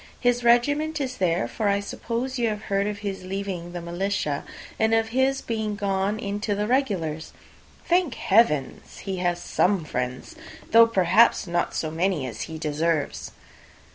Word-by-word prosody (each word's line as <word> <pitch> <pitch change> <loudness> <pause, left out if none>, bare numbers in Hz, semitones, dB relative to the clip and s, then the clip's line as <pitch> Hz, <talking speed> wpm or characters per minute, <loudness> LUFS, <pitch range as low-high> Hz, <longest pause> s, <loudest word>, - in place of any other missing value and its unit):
His 245 -1 +1
regiment 290 +7 +3
is 260 -2 -3
there; 165 -10 +1
for 210 - -2
I 200 0 +2
suppose 240 +5 -4
you 235 -1 +2
have 210 0 -4
heard 200 0 0
of 210 -1 -3
his 195 -2 -4
leaving 185 -2 -4
the 175 +2 -3
shire, 150 -8 -1 0.4
and 220 0 +3
of 225 0 +1
his 265 +3 +1
being 220 -2 -2
gone 200 +1 -1
into 205 0 -2
the 205 +1 -1
Regulars. 190 - -1 0.5
Thank 350 -5 +2
heaven! 170 - +2 0.2
he 190 -2 -4
has 175 -1 0
some 185 -1 +1
friends, 125 -2 -4 0.4
though, 230 +1 +8
perhaps, 205 +2 +4
not 175 -1 -1
so 155 - -2
many 165 -3 0
as 115 -4 -6
he 160 - -6
deserves." 155 0 -1
200 Hz, 160 wpm, -25 LUFS, 170-230 Hz, 0.5 s, though